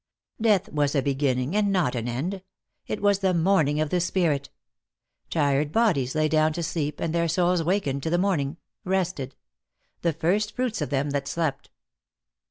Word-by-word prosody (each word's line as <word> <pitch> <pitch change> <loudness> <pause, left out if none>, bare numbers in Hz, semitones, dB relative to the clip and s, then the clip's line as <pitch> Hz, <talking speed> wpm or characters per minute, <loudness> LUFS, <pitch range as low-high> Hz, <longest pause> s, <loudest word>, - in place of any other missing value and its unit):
Death 210 -3 +3
was 145 -1 +1
a 135 - +2
beginning 135 +2 0
and 205 -1 +2
not 180 -10 +1
an 120 -2 -3
end; 165 +11 -3 0.5
it - - -4
was 200 -1 +3
the 190 -2 +1
morning 160 -4 +2
of 155 -1 -1
the 180 - +2
spirit. 160 -6 0 0.8
Tired 145 -1 +1
bodies 155 - +1
lay 155 0 +2
down 155 0 +2
to 170 - -3
sleep 150 -3 -2
and 165 -1 -2
their 170 0 +1
souls 175 +1 +2
wakened 160 -6 0
to 160 - -2
the 175 - +2
morning, 170 -6 0 0.3
rested; 180 -8 -2 0.7
the 170 - +2
first 180 +7 0
fruits 250 -3 -1
of - - -2
them 140 +1 0
that 140 -1 -2
slept. 160 -4 -2
160 Hz, 175 wpm, -25 LUFS, 140-185 Hz, 0.8 s, Death